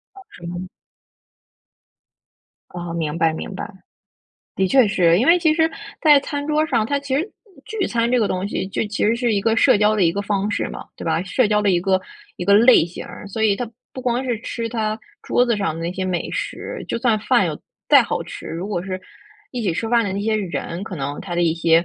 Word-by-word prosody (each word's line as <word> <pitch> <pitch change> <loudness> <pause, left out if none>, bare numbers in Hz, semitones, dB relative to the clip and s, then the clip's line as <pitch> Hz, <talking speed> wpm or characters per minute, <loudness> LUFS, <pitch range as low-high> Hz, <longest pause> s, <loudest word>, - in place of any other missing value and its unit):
啊， 390 - -12
什 170 - -12
么？ 175 +1 -5 2.0
哦， 175 -1 -6
明 160 -1 -2
白， 160 -1 +2
明 160 - -6
白。 200 +3 -6 0.9
的 190 - +2
确 260 -1 +5
是， 175 -3 +3
因 245 - +2
为 340 +2 +6
其 325 -3 +3
实 320 0 +2 0.3
在 300 -3 +7
餐 285 0 -4
桌 305 0 +2
上， 220 -8 +1
它 285 +2 0
其 275 -1 -3
实 335 +8 -1 0.4
聚 435 -3 -2
餐 235 0 0
这 250 - +3
个 220 - +2
东 185 +1 -2
西 190 - -2
就 210 - -1
其 210 - -2
实 220 - +3
是 240 -2 +1
一 200 - +1
个 225 +2 +1
社 255 0 +5
交 210 +1 +3
的 205 - +1
一 165 - +3
个 200 - -2
方 205 0 -1
式 - - -1
嘛， - - -8
对 - - -8
吧？ 165 +1 0
社 215 +5 +1
交 210 -1 +3
的 205 -2 +2
一 175 -1 +2
个 190 0 +2 0.4
一 180 - -4
个 200 - +5
类 230 -5 +7
型 175 - -8
儿， - - -10
所 220 +3 -3
以 205 -2 +3
它 245 -3 -4 0.2
不 260 - -7
光 250 0 0
是 240 -3 -1
吃 230 -1 -4
它 220 -1 -2 0.2
桌 245 - +2
子 235 -3 +1
上 165 -6 -1
的 165 - -6
那 170 +2 -3
些 185 0 -3
美 185 -2 -2
食， - - -5
就 - - -1
算 230 -3 +2
饭 220 -4 +2
有 155 - -4 0.3
再 - - +8
好 - - -2
吃， - - -9
如 175 +5 -5
果 175 -4 -2
是 185 -1 -5 0.5
一 245 -3 -4
起 185 -5 +1
吃 225 +7 -3
饭 235 -1 +3
的 190 - -2
那 200 - -2
些 220 +1 0
人， 170 -1 -4
可 190 - -7
能 140 +1 -4
他 180 -2 -5
的 175 - +1
一 165 - +3
些 165 0 +3
205 Hz, 260 characters per minute, -21 LUFS, 175-240 Hz, 2.0 s, 再